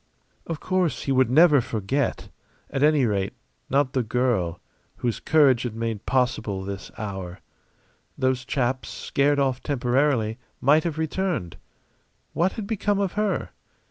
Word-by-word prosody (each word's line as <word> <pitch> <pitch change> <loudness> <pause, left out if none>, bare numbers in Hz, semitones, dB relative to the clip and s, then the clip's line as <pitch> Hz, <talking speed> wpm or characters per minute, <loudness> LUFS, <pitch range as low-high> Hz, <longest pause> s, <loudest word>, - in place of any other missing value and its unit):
Of 165 -2 -4
course 185 -3 0
he 135 - -1
would 130 -2 +3
never 150 +1 +6
forget 115 +4 -2 0.4
at 135 - -2
any 150 -3 +4
rate, 100 -3 -1 0.4
not 135 -1 +2
the 130 - +2
girl 110 -8 0 0.4
whose 120 -2 -2
courage 140 -6 +4
had 120 -3 -4
made 115 -2 -4
possible 120 -7 0
this 100 0 -6
hour. 95 -3 -5 0.8
Those 130 -1 0
chaps, 130 0 -1
scared 145 +1 0
off 135 -2 +1
temporarily, 125 -3 +1 0.2
might 150 +5 +4
have 160 -3 -2
returned. 160 - -2 0.8
What 175 +3 +1
had 220 - -5
become 205 -1 0
of 195 -3 0
her? 210 -1 -1
130 Hz, 140 wpm, -25 LUFS, 115-150 Hz, 0.8 s, never